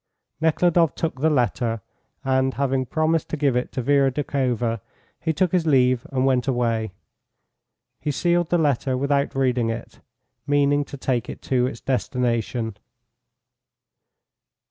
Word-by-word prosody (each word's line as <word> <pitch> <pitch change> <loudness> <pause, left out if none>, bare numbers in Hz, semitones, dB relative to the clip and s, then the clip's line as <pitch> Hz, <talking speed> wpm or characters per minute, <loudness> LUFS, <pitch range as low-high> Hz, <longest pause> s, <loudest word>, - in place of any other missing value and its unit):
Nekhludoff 165 +1 +3
took 160 -5 -3
the 160 - +4
letter, 120 - 0 0.5
and, 130 0 +1
having 135 -2 0
promised 155 +4 0
to 155 - -3
give 140 -4 +1
it 125 - -1
to 130 - -2
Vera 140 0 +3
Doukhova, 125 -5 -1 0.4
he 160 - 0
took 175 +3 +1
his 175 -3 +1
leave 130 -4 +3
and 130 -1 +1
went 130 -3 +2
away. 115 -4 0 1.1
He 150 - -3
sealed 175 +3 +1
the 175 - +3
letter 140 -4 +1
without 140 +1 0
reading 125 -3 +1
it, 115 0 -6 0.5
meaning 145 0 +3
to 140 - -9
take 130 -3 -1
it - - -8
to 125 -1 +1
its 125 -3 -7
destination. 120 -4 -1
135 Hz, 140 wpm, -23 LUFS, 125-145 Hz, 1.1 s, the